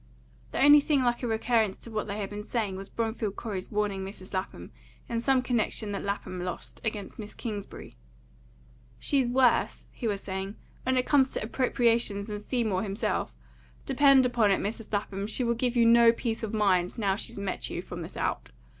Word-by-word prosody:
The -, -, -3 dB
only 290 Hz, +2 st, +8 dB
thing 285 Hz, -2 st, +2 dB
like 240 Hz, -1 st, +1 dB
a 245 Hz, -, -1 dB
recurrence 220 Hz, -2 st, +1 dB
to 230 Hz, -, -9 dB
what 215 Hz, -1 st, -2 dB
they 200 Hz, 0 st, -3 dB
had 205 Hz, -2 st, -4 dB
been 205 Hz, 0 st, -5 dB
saying 215 Hz, -3 st, -2 dB
was 195 Hz, +1 st, -8 dB
Bromfield 225 Hz, -3 st, -2 dB
Corey's 200 Hz, -5 st, -5 dB
warning 205 Hz, -2 st, -1 dB
Mrs. 190 Hz, 0 st, -9 dB
Lapham, 185 Hz, -, -4 dB, 0.4 s
in 230 Hz, -, -1 dB
some 260 Hz, +1 st, +2 dB
connection 225 Hz, -3 st, -1 dB
that 200 Hz, -, -3 dB
Lapham 190 Hz, -2 st, -3 dB
lost, 180 Hz, -1 st, -6 dB
against 215 Hz, -1 st, -4 dB
Miss 210 Hz, -1 st, -7 dB
Kingsbury. 210 Hz, -4 st, -7 dB, 1.0 s
"She's 270 Hz, -4 st, +1 dB
worse," 250 Hz, 0 st, +2 dB
he 235 Hz, -, -4 dB
was 200 Hz, -2 st, -2 dB
saying, 190 Hz, +1 st, -4 dB, 0.3 s
"when 260 Hz, 0 st, 0 dB
it 250 Hz, -, +2 dB
comes 270 Hz, -3 st, +4 dB
to -, -, -2 dB
appropriations 230 Hz, -3 st, +1 dB
than 210 Hz, 0 st, -4 dB
Seymour 215 Hz, -4 st, -1 dB
himself. 200 Hz, -, -2 dB, 0.5 s
Depend 275 Hz, -2 st, +5 dB
upon 235 Hz, -4 st, +3 dB
it, 195 Hz, -, +3 dB
Mrs. 215 Hz, +2 st, -4 dB
Lapham, 200 Hz, -1 st, -2 dB
she 235 Hz, +4 st, 0 dB
will 235 Hz, 0 st, +2 dB
give 245 Hz, +1 st, -1 dB
you 235 Hz, -1 st, +5 dB
no 235 Hz, 0 st, +7 dB
peace 230 Hz, -1 st, -3 dB
of 220 Hz, -2 st, -3 dB
your -, -, 0 dB
mind, 185 Hz, -2 st, +2 dB
now 200 Hz, -4 st, +1 dB
she's 205 Hz, -, -5 dB
met 200 Hz, -2 st, -3 dB
you, -, -, -4 dB
from -, -, -7 dB
this -, -, -8 dB
out. -, -, -2 dB
220 Hz, 195 wpm, -28 LUFS, 200-240 Hz, 1.0 s, only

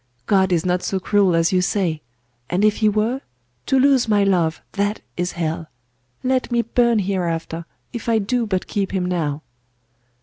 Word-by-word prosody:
God 190 Hz, -2 st, +3 dB
is 170 Hz, 0 st, +1 dB
not 180 Hz, 0 st, +1 dB
so 190 Hz, -, -1 dB
cruel 195 Hz, -2 st, +2 dB
as 165 Hz, 0 st, +2 dB
you 185 Hz, -, +3 dB
say! 180 Hz, -4 st, 0 dB, 0.5 s
And 185 Hz, +4 st, +2 dB
if 215 Hz, 0 st, +3 dB
He 215 Hz, -2 st, +3 dB
were: 220 Hz, +6 st, 0 dB, 0.5 s
to 270 Hz, -, +3 dB
lose 265 Hz, -3 st, +4 dB
my 205 Hz, -2 st, +3 dB
love, 175 Hz, -5 st, +1 dB
that 205 Hz, +1 st, -1 dB
is 180 Hz, +1 st, -2 dB
hell! 165 Hz, -1 st, -3 dB, 0.6 s
Let 255 Hz, -1 st, 0 dB
me 235 Hz, -1 st, +2 dB
burn 235 Hz, 0 st, +2 dB
hereafter, 170 Hz, -4 st, -2 dB, 0.3 s
if 235 Hz, -1 st, -4 dB
I 225 Hz, -, +4 dB
do 230 Hz, +3 st, 0 dB
but 190 Hz, -3 st, -1 dB
keep 195 Hz, -2 st, -2 dB
him 185 Hz, -2 st, 0 dB
now! 155 Hz, -5 st, -2 dB
195 Hz, 175 wpm, -21 LUFS, 175-220 Hz, 0.6 s, lose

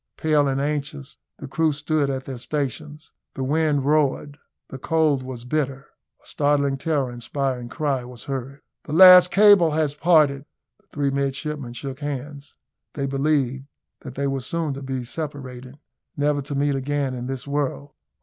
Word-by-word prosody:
Pale 150 Hz, -2 st, +2 dB
and 135 Hz, 0 st, 0 dB
anxious 145 Hz, 0 st, -4 dB, 0.2 s
the 145 Hz, -, -8 dB
crew 160 Hz, +3 st, +1 dB
stood 145 Hz, 0 st, -1 dB
at 135 Hz, -1 st, -3 dB
their 130 Hz, -3 st, -6 dB
stations. 150 Hz, +3 st, -4 dB, 0.2 s
The 135 Hz, -, -3 dB
wind 145 Hz, 0 st, +1 dB
roared, 145 Hz, -1 st, +1 dB, 0.3 s
the 135 Hz, -, -8 dB
cold 155 Hz, -2 st, +1 dB
was 130 Hz, -2 st, -8 dB
bitter. 135 Hz, 0 st, -2 dB, 0.3 s
A -, -, -25 dB
startling 140 Hz, -1 st, +1 dB
terror 140 Hz, -4 st, -1 dB
inspiring 125 Hz, 0 st, -3 dB
cry 140 Hz, -2 st, -1 dB
was 125 Hz, -1 st, -10 dB
heard. 135 Hz, +1 st, -6 dB, 0.2 s
"The 150 Hz, -, -6 dB
last 180 Hz, +1 st, +9 dB
cable 200 Hz, -4 st, +6 dB
has 155 Hz, -2 st, +1 dB
parted!" 150 Hz, -3 st, +3 dB, 0.3 s
The -, -, -33 dB
three 140 Hz, -1 st, -1 dB
midshipmen 140 Hz, -1 st, -3 dB
shook 135 Hz, +2 st, -7 dB
hands; 145 Hz, 0 st, -6 dB, 0.4 s
they 140 Hz, -3 st, -3 dB
believed 135 Hz, -1 st, 0 dB, 0.3 s
that 130 Hz, -2 st, -10 dB
they 140 Hz, -, -2 dB
were 135 Hz, -1 st, -1 dB
soon 165 Hz, +1 st, -2 dB
to 135 Hz, -, -7 dB
be 130 Hz, -2 st, -4 dB
separated, 130 Hz, -2 st, -7 dB, 0.4 s
never 145 Hz, 0 st, +1 dB
to 140 Hz, +1 st, -6 dB
meet 140 Hz, +1 st, +1 dB
again 135 Hz, 0 st, -2 dB
in 125 Hz, -1 st, -5 dB
this 135 Hz, 0 st, -5 dB
world. 145 Hz, 0 st, -3 dB
140 Hz, 160 wpm, -23 LUFS, 135-150 Hz, 0.4 s, last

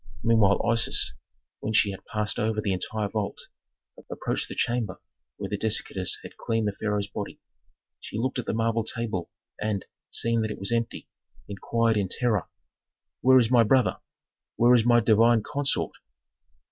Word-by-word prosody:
Meanwhile 110 Hz, -4 st, +4 dB
Isis, 115 Hz, -, +1 dB, 0.5 s
when 110 Hz, -, -3 dB
she 110 Hz, -1 st, +4 dB
had 95 Hz, -, -9 dB
passed 105 Hz, 0 st, -2 dB
over 110 Hz, 0 st, 0 dB
the 105 Hz, -2 st, 0 dB
entire 105 Hz, +3 st, -2 dB
vault, 105 Hz, -1 st, -3 dB, 0.7 s
approached -, -, -3 dB
the -, -, -6 dB
chamber 120 Hz, -6 st, -1 dB, 0.4 s
where -, -, -4 dB
the 105 Hz, -, -2 dB
dissectors 105 Hz, -4 st, 0 dB
had -, -, -11 dB
cleaned 115 Hz, -1 st, -1 dB
the -, -, +1 dB
pharaoh's 105 Hz, -1 st, 0 dB
body. 100 Hz, -, -6 dB, 0.6 s
She -, -, -7 dB
looked 130 Hz, +3 st, -1 dB
at 125 Hz, -, -5 dB
the -, -, 0 dB
marble 115 Hz, 0 st, +1 dB
table, 110 Hz, -6 st, -3 dB, 0.3 s
and, 105 Hz, -2 st, -1 dB, 0.2 s
seeing 115 Hz, 0 st, 0 dB
that 110 Hz, -, -1 dB
it 105 Hz, -, -5 dB
was 100 Hz, -, -4 dB
empty, 115 Hz, 0 st, -2 dB, 0.4 s
inquired 115 Hz, +3 st, 0 dB
in 100 Hz, -2 st, +1 dB
terror, 110 Hz, -3 st, 0 dB, 0.7 s
"Where 130 Hz, +1 st, +6 dB
is 120 Hz, -2 st, +3 dB
my 120 Hz, -2 st, +6 dB
brother? 125 Hz, +3 st, +3 dB, 0.6 s
Where 120 Hz, +1 st, +5 dB
is 120 Hz, -2 st, +5 dB
my 120 Hz, -1 st, +6 dB
divine 115 Hz, 0 st, +4 dB
consort?" 145 Hz, +2 st, 0 dB
110 Hz, 160 wpm, -26 LUFS, 105-115 Hz, 0.7 s, Where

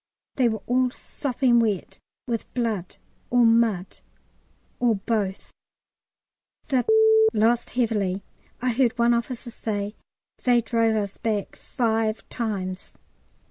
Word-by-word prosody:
They 250 Hz, -3 st, +3 dB
were 220 Hz, -2 st, -4 dB
all 255 Hz, +1 st, +2 dB
sopping 250 Hz, -1 st, 0 dB
wet 210 Hz, -6 st, -1 dB, 0.3 s
with 235 Hz, -3 st, -4 dB
blood 220 Hz, -7 st, -2 dB, 0.3 s
or 245 Hz, -1 st, +4 dB
mud 225 Hz, -5 st, +2 dB, 0.8 s
or 235 Hz, -3 st, +3 dB
both. 200 Hz, -1 st, -2 dB, 1.2 s
The 260 Hz, -3 st, +2 dB, 0.5 s
lost 230 Hz, +3 st, +2 dB
heavily. 205 Hz, -5 st, 0 dB, 0.4 s
I 255 Hz, -, +2 dB
heard 245 Hz, 0 st, +1 dB
one 235 Hz, 0 st, +4 dB
officer 235 Hz, +1 st, -3 dB
say, 205 Hz, -2 st, -3 dB, 0.5 s
"They 245 Hz, -1 st, +4 dB
drove 230 Hz, -1 st, +1 dB
us 200 Hz, -2 st, -3 dB
back 215 Hz, -4 st, -2 dB
five 225 Hz, -3 st, -1 dB
times." 195 Hz, -5 st, -4 dB
230 Hz, 110 wpm, -24 LUFS, 210-240 Hz, 1.2 s, or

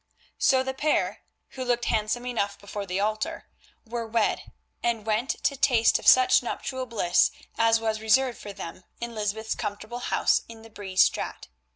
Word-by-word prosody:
So 260 Hz, -2 st, +4 dB
the 265 Hz, 0 st, -3 dB
pair, 295 Hz, +3 st, 0 dB, 0.3 s
who 260 Hz, -, -6 dB
looked 245 Hz, -1 st, 0 dB
handsome 220 Hz, +3 st, 0 dB
enough 205 Hz, -5 st, -2 dB
before 200 Hz, 0 st, -6 dB
the 185 Hz, +1 st, -2 dB
altar, 215 Hz, +1 st, -2 dB, 0.4 s
were 230 Hz, 0 st, -4 dB
wed, 225 Hz, -1 st, 0 dB, 0.3 s
and 230 Hz, -3 st, -1 dB
went 220 Hz, +4 st, 0 dB
to 280 Hz, -, +1 dB
taste 245 Hz, -4 st, +3 dB
of -, -, -6 dB
such 255 Hz, 0 st, +7 dB
nuptial 260 Hz, +1 st, -4 dB
bliss 180 Hz, -7 st, +3 dB, 0.3 s
as 225 Hz, 0 st, +3 dB
was 220 Hz, -1 st, -2 dB
reserved 250 Hz, +3 st, +2 dB
for 205 Hz, -, -8 dB
them 185 Hz, -2 st, -8 dB, 0.2 s
in 235 Hz, 0 st, -5 dB
Lysbeth's 220 Hz, +1 st, -2 dB
comfortable 215 Hz, +4 st, -5 dB
house 245 Hz, -, +2 dB
in 225 Hz, -1 st, -11 dB
the 225 Hz, -, -14 dB
Bree 195 Hz, -3 st, -8 dB
Straat. 185 Hz, -, +1 dB
225 Hz, 170 wpm, -26 LUFS, 210-245 Hz, 0.4 s, such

